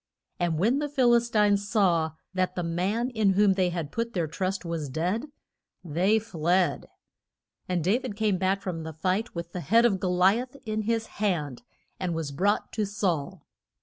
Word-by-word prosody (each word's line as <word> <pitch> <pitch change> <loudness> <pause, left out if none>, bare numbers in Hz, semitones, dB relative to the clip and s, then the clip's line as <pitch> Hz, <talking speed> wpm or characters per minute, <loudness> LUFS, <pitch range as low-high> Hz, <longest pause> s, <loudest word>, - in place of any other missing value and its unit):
And 170 -3 0
when 230 - +2
the 295 0 -2
Phil 255 -4 +3
is 235 0 +3
tines 205 -2 +2
saw 170 -8 +2 0.2
that 185 -1 0
the 180 - -2
man 190 +9 -1
in 215 -4 +2
whom 200 0 +4
they 185 -1 +1
had 170 -4 -4
put 230 0 -3
their 175 -3 0
trust 185 +4 -3
was 165 -4 -3
dead 180 - -1 0.6
they 180 +6 +2
fled. 180 -4 0 0.8
And 180 -3 0
Da 200 +8 +2
vid 255 -6 -6
came 210 -3 +1
back 190 +1 0
from 170 -3 -3
the 160 0 -6
fight 185 +8 -1
with 170 0 -5
the 180 - -4
head 225 +10 +4
of 200 -5 +2
Go 185 - -1
li 185 +5 +4
ath 250 +2 -7
in 215 0 -1
his 225 -1 +1 0.2
hand, 150 - -1 0.4
and 175 -2 -2
was 160 -3 -3
brought 200 +9 0
to 215 -2 0
Saul. 185 -5 -2
190 Hz, 190 wpm, -27 LUFS, 170-215 Hz, 0.8 s, whom